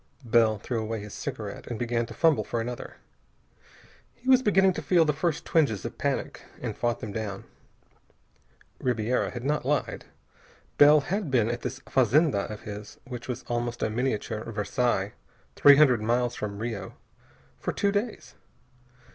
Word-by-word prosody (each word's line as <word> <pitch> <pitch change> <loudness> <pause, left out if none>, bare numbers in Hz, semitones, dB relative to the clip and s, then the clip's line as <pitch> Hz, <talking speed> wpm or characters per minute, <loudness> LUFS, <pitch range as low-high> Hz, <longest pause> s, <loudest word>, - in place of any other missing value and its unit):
Bell 115 -2 +4
threw 115 +2 -3
away 110 0 -3
his 105 0 -9
cigarette - - -6
and 120 - -4
began 120 -1 -1
to - - -9
fumble 165 -3 +3
for 120 - -3
another. 120 +1 -5 1.2
He 255 - -15
was 260 -1 +6
beginning 195 -5 +4
to - - -4
feel 175 -3 +4
the 150 - +2
first 160 +1 -1
twinges 140 - +1
of - - -6
panic, - - -2 0.2
and - - -4
fought 120 -4 -1
them 105 - -5
down. 100 -2 -4 1.4
Ribiera 120 -1 0
had 120 -1 -7
not 150 +3 0
lied. 145 +3 -1 0.7
Bell 150 +1 +8
had 190 +3 -2
been 120 -3 +2
at 120 - -4
this 130 - -5
fazenda 130 -3 +2
of 105 - -7
his 105 0 -8
which 125 -2 -7
was 125 - -4
almost 120 0 -3
a 110 - 0
miniature 110 -2 -2
Versailles 105 -1 0 0.4
three 145 0 +8
hundred 135 -6 +5
miles 120 +2 +1
from 105 -3 -5
Rio 110 -1 -5 0.6
for - - -2
two 200 - +1
days. 210 +3 -3
120 Hz, 160 wpm, -27 LUFS, 110-145 Hz, 1.4 s, Bell